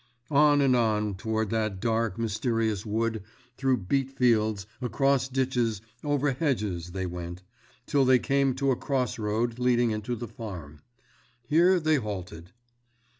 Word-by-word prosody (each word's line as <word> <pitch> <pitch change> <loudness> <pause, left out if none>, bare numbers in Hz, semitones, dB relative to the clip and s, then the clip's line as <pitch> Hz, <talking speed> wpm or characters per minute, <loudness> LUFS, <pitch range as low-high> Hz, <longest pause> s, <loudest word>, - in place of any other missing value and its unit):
On 145 0 +5
and 135 -2 +4
on 105 -3 +1
toward 110 +2 -2
that 110 -4 -1
dark, 115 -2 0
mysterious 110 -1 -1
wood 110 +1 -1 0.3
through 130 -5 0
beet 135 +5 0
fields, 110 -6 +1 0.2
across 135 +2 +1
ditches, 125 -5 0 0.2
over 145 -1 +1
hedges 105 - -2
they 95 -1 -2
went, 90 0 -6 0.4
till 140 0 +2
they 130 0 +5
came 135 0 +1
to 135 0 +1
a - - +2
cross 130 -3 -2
road 115 +3 -1
leading 120 -2 +2
into 110 +3 -3
the 120 +1 -6
farm. 85 -10 -9 0.6
Here 175 +7 +4
they 155 -1 +2
halted. 90 -7 -6
115 Hz, 140 wpm, -27 LUFS, 105-135 Hz, 0.6 s, On